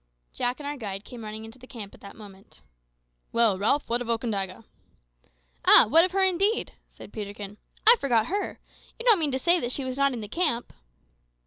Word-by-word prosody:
Jack 245 +3 -2
and 290 - -8
our 290 0 -4
guide 200 -4 -6
came 240 -2 -10
running 215 +1 -7
into 225 +3 -13
the 255 - -15
camp 210 -6 -9
at - - -17
that 200 - -12
moment. 195 - -15 0.7
"Well, 225 -5 +2
Ralph, 255 +8 +2
what 240 +1 -1
of 240 - -6
Okandaga?" 220 -3 -3 1.0
"Ah! - - +8
what 325 +9 +6
of 365 - +1
her 390 0 +2
indeed?" 380 +4 +1 0.2
said - - -14
Peterkin. 205 -1 -7 0.3
"I 470 +2 +8
forgot 235 -5 +2
her. 400 +9 -4 0.4
You 470 - -9
don't 455 -6 +5
moan 305 -3 +1
to 260 - 0
say 340 -3 +2
she 265 +2 -3
was 260 0 -5
not 275 -1 +2
in 235 - -5
the 210 - -6
camp?" 245 - -1
240 Hz, 200 wpm, -26 LUFS, 210-295 Hz, 1.0 s, Ah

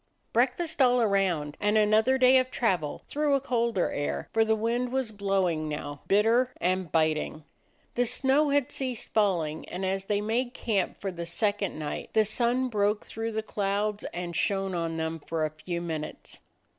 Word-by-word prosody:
Breakfast 290 +7 +1
all 250 -1 +5
around, 190 -9 +1
and 210 +1 +2
another 215 +5 +4
day 260 0 +6
of 255 0 -1
travel 180 - -1
through 295 -1 +1
a - - +2
colder 235 -7 0
air; 145 - -3
for 225 - +4
the 220 0 +2
wind 235 +3 -1
was 260 -3 -1
blowing 190 -6 0
now, 145 -1 -5
bitter 225 +5 +3
and 185 -2 0
biting. 155 -1 0 0.5
The 245 - +1
snow 270 +4 +2
had 285 -1 +1
ceased 255 -4 -3
falling, 170 -8 0
and 185 +2 -4
as 190 0 -1
they 205 0 0
made 240 +4 -1
camp 205 -5 -1
for 195 - -3
the 170 -1 -6
second 205 +1 -1
night 150 -1 -5
the 220 -1 +4
sun 240 +4 +1
broke 210 -2 0
through 225 0 -4
the 220 0 -2
clouds 205 0 -1
and 175 -1 -5
shone 195 +1 0
on 165 -1 -2
them 160 0 -2
for 160 +1 -2
a 155 - -3
few 170 +3 -5
minutes. 160 -3 -6
210 Hz, 175 wpm, -28 LUFS, 175-240 Hz, 0.5 s, day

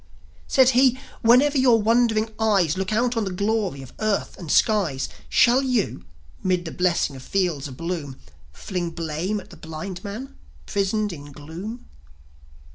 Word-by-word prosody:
Said 260 -1 +5
he: 255 0 +4 0.2
"Whenever 265 +5 +5
your 245 -3 +5
wondering 225 0 +2
eyes 195 -7 +3
Look 190 +1 -2
out 240 +3 +1
on 225 - +1
the 195 - -3
glory 200 -6 -1
of 130 - -13
earth 215 -2 -1
and 170 -5 -5
skies, 185 - +2 0.2
Shall 245 - +5
you, 250 -6 -1 0.4
'mid 180 -2 0
the 165 - -5
blessing 175 -5 +1
of 130 - -9
fields 170 -3 -1
a - - -9
bloom, 150 -1 -5 0.3
Fling 175 - -4
blame 165 +5 -3
at 190 - -14
the - - -12
blind 160 +4 -7
man, 220 +6 -7 0.3
prisoned 200 0 0
in 145 -2 -10
gloom?" 170 - -8
195 Hz, 155 wpm, -23 LUFS, 165-225 Hz, 0.4 s, Said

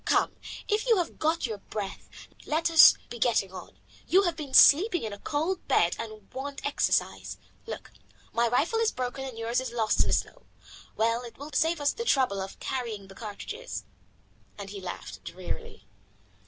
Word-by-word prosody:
Come, - - +2 0.3
if 425 +3 0
you 455 -3 +5
have 350 -2 -2
got 320 +2 +1
your 220 -4 -4
breath, 200 -1 -6 0.4
let 325 +2 +1
us 325 - +9 0.2
be 240 - -6
getting 220 -5 +1
on. 185 - -10 0.3
You 385 +2 +5
have 345 -3 0
been 285 -4 -5
sleeping 350 - +7
in 215 -2 -4
a 205 - -9
cold 325 - -2
bed 170 - +3
and 215 -2 -8
want 275 +2 -6
exercise. 285 - 0 0.3
Look, - - -7 0.4
my 235 +1 +3
rifle 315 - +1
is 455 -1 +2
broken 255 +1 -4
and 255 -4 -7
yours 230 +2 0
is 260 - -5
lost 220 -3 +2
in - - +2
the - - +1
snow. - - -2 0.5
Well, 230 +2 +1
it 240 -2 -10
will 290 +2 -9
save 325 +3 +2
us 285 -1 +1
the 465 - -4
trouble 255 - +2
of 190 0 -7
carrying 225 -7 -4
the - - -11
cartridges," 230 - -7 0.7
and 200 -1 -7
he 200 -1 -7
laughed 180 -1 -7
drearily. 180 +1 -7
255 Hz, 180 wpm, -28 LUFS, 215-325 Hz, 0.7 s, us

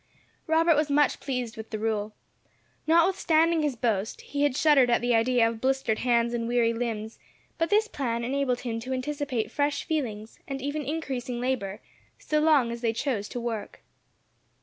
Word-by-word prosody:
Robert 325 +1 +4
was 300 0 +1
much 290 -1 +2
pleased 250 -4 -3
with 220 -1 -8
the 215 - -3
rule. 215 -1 -2 0.7
Notwithstanding 330 -1 +3
his 295 -4 0
boast, 220 -3 -1
he 285 - -4
had 290 -2 +2
shuddered 290 -6 +5
at 240 - +3
the 245 0 +1
idea 230 0 +3
of 225 -1 -5
blistered 265 -4 0
hands 235 -1 +2
and 230 -1 -2
weary 235 -1 +2
limbs; 225 -2 -4 0.4
but 330 - +1
this 430 +1 +3
plan 235 - -2
enabled 255 0 0
him 230 -2 -3
to 255 +3 -4
anticipate 260 -4 -2
fresh 285 +1 0
feelings, 230 -9 -4
and 275 -1 -4
even 285 +3 -3
increasing 260 -5 -3
labour, 235 -5 -2 0.4
so 305 - 0
long 300 -6 +4
as 235 0 -6
they 230 -2 +1
chose 225 -4 -2
to 245 - -5
work. 230 -3 -5
250 Hz, 170 wpm, -27 LUFS, 230-290 Hz, 0.7 s, shuddered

